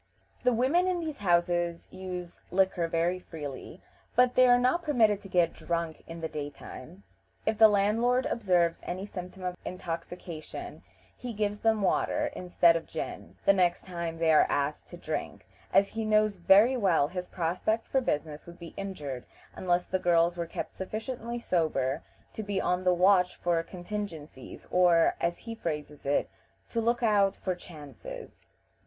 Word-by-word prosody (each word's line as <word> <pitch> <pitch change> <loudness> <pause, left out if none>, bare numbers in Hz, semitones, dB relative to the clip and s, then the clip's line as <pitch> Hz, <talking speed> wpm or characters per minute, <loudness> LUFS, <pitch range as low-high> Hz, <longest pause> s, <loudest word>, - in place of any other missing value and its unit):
The 250 - +4
women 270 +10 +2
in 365 -1 0
these 315 -3 -5
houses 175 -2 +1
use 180 -2 -7
liquor 185 -2 +2
very 170 +2 0
freely, 155 0 -8 0.3
but 250 0 +5
they 255 0 +6
are 245 0 +7
not 255 +8 +2
permitted 230 - +3
to 195 - -11
get 175 -2 +2
drunk 170 -2 -3
in 165 0 -8
the 160 - -1
daytime. 150 +3 -8 0.4
If 220 -1 0
the 220 - +10
landlord 225 +5 +2
observes 180 -6 +1
any 185 +2 -5
symptom 185 -1 -8
of 180 -1 -2
intoxication 170 -2 -6 0.3
he 245 -2 -6
gives 205 -1 -1
them 220 -2 +2
water, - - +1
instead 175 -2 +4
of 165 - -3
gin, 160 - -6
the 200 - +7
next 180 -2 +1
time 170 -3 -4
they 165 -1 +3
are 155 - +6
asked 145 +1 -1
to - - -10
drink, - - -5 0.3
as 200 0 +4
he 225 - -3
knows 215 -1 +2
very 200 +8 +6
well 185 - +3
his 180 0 -5
prospects 185 +7 -1
for 265 - +1
business 150 - -3
would 170 0 -11
be 170 -2 -10
injured 150 -11 -5 0.3
unless 180 -1 0
the 185 - -1
girls 170 -1 +3
were 170 -1 -3
kept - - -5
sufficiently 230 +4 -5
sober 155 - 0 0.3
to - - -5
be 200 -2 -2
on 180 0 0
the 180 - +4
watch 180 0 +4
for 170 -1 +1
contingencies, 175 -6 -7
or, 175 -2 +4
as 170 0 0
he 230 - -7
phrases 150 -8 -5
it, 145 - +2 0.4
"to 230 - -1
look 235 +2 +1
out 205 -3 +3
for 185 - -2
chances." 175 - -11
180 Hz, 165 wpm, -29 LUFS, 170-215 Hz, 0.4 s, the